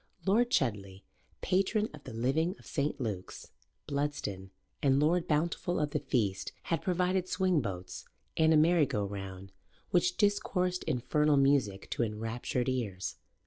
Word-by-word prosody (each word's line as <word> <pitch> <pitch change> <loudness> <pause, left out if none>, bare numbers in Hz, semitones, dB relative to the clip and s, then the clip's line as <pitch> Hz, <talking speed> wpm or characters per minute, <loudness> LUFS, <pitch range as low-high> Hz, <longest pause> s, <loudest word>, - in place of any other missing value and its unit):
Lord 230 +5 +3
Chudley, 100 - -1 0.4
patron 195 +3 +1
of 150 - -12
the - - -7
living 145 - 0
of - - -18
St. 145 0 -2
Luke's, 105 -7 -5 0.3
Bludston, 140 -10 -3 0.3
and 135 -1 +4
Lord 165 +4 +2
Bountiful 170 +3 0
of 150 -1 0
the - - 0
feast, 100 -6 -1
had 165 -3 -1
provided 180 0 +1
swing 185 -5 +2
boats 90 -4 -6 0.3
and 160 0 +4
a 160 - +6
merry 160 -1 +4
go 105 -3 -1
round 95 -1 -7 0.4
which 180 0 +2
discoursed 185 -3 +1
infernal 150 +4 +2
music 135 -8 +2
to - - -1
enraptured 115 +3 -2
ears. 105 -8 -2
140 Hz, 145 wpm, -31 LUFS, 105-175 Hz, 0.4 s, a